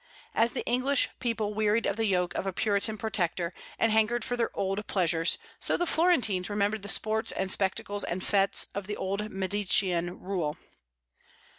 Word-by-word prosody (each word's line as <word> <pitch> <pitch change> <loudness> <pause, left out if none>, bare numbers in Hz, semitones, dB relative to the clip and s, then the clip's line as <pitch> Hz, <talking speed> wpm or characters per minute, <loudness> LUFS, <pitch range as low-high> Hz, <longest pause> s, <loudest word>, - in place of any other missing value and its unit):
As 230 +1 +2
the 260 - -3
English 255 +3 +2
people 225 -4 -1
wearied 215 +1 +1
of - - 0
the 225 0 0
yoke 180 -2 +1
of 195 - -3
a - - 0
Puritan 210 +3 0
Protector, 180 -5 -1 0.2
and 225 - +2
hankered 220 +1 +2
for 245 - -1
their 235 -1 0
old 195 +2 -2
pleasures, 170 -3 +2 0.2
so - - 0
the 350 - 0
Florentines 270 - +2
remembered 205 +1 0
the 200 - -4
sports 220 +2 0
and 190 -1 -2
spectacles 200 +1 -1
and 185 +2 -3
fêtes 200 -1 +3
of 195 -1 -5
the 210 - -4
old 200 +3 -3
Medicean 190 -2 0
rule. 175 -6 -2
205 Hz, 170 wpm, -29 LUFS, 190-220 Hz, 0.2 s, fêtes